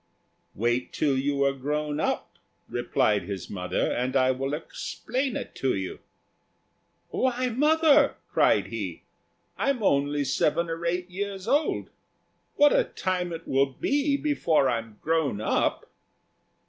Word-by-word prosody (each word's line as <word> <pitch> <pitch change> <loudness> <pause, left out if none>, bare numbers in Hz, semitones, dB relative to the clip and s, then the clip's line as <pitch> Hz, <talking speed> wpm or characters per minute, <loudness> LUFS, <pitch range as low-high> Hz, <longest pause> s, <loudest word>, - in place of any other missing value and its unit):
"Wait 120 +4 0
till 145 -3 +1
you 140 +1 +1
are 140 - +2
grown 150 +2 -2
up," - - -2 0.3
replied 105 -4 +1
his 95 0 -6
mother, 90 -2 -1
"and 125 +2 -1
I 130 -1 +4
will 135 +3 -2
explain 250 - -3
it - - -7
to 135 - +1
you." 95 -1 -4 1.1
"Why, 255 0 0
mother," 295 +3 +4
cried - - +3
he, - - -5 0.6
"I'm 275 -5 0
only 145 -3 +2
seven 155 +5 +1
or 165 +1 -3
eight 180 +1 -2
years 195 +1 -4
old. 285 +5 +1 0.6
What 290 0 +6
a - - +3
time 180 -1 -2
it 165 0 -7
will 135 +1 +3
be 280 - 0
before 170 - +2
I'm 115 -3 -3
grown 155 -9 +1
up." 110 - 0
150 Hz, 135 wpm, -27 LUFS, -, 1.1 s, What